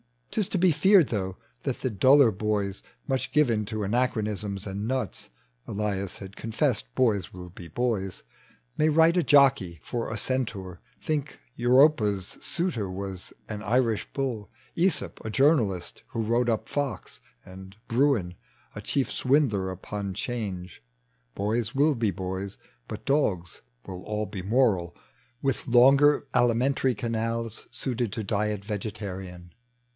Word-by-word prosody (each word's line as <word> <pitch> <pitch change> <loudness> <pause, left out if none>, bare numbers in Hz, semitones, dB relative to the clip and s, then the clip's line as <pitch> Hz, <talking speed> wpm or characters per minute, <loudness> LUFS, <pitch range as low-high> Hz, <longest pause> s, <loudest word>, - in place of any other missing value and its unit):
'Tia 215 - +1
to 190 - -2
be 180 0 +4
feared, 175 +1 +5
though, 95 -4 -2 0.3
that - - -3
the 130 - 0
duller 130 +4 +5
bojs, 100 -1 -2 0.2
Much 130 - -2
given 120 -8 +3
to 110 +1 -3
anachronisms 105 -3 -1
and 100 +1 -4
nuts, 130 0 -3 0.4
(Elias 100 -2 -2
has 95 - -8
confessed 110 - 0
boys 110 -7 +1
will 90 -1 -9
be 85 -1 -11
boys) 100 0 -2 0.5
May 155 - +3
write 165 +3 +5
a 175 - +3
jockey 135 - +4
for 115 -2 -3
a 110 - -3
centaur, 105 -8 -3 0.2
think 150 -2 -2 0.2
Europa's 120 -6 +3
suitor 160 - -1
was 95 0 -6 0.2
an 105 -1 -5
Irish 115 0 +1
bull, 125 -7 -3 0.3
^sop 180 +2 0
a 110 - -4
journalist 115 - +2
who 115 - -3
wrot« 120 +2 +1
up 110 -2 -1
Fox, 140 - -4 0.2
And 95 +1 -11
Bruin 115 -8 +2 0.4
a - - -7
chief 135 -2 -1
swindler 125 -9 +2
upon 100 +1 -5
'Change. 95 -5 -5 0.5
Boys 110 +3 0
will 150 +3 +4
be 115 -5 0
boya, 95 +1 -5 0.3
but - - -7
dogs 100 - 0 0.2
will 90 -1 -7
all 105 0 -2
be 100 -1 -6
moral. 100 -5 +2 0.5
With 135 0 -1
loiter 135 +4 +6
alimentary 125 +2 +2
canals 115 -1 -3
Suited 120 -3 -2
to 110 - -3
diet 105 0 -1
vegetarian. 95 -4 -6
110 Hz, 135 wpm, -27 LUFS, 100-130 Hz, 0.5 s, loiter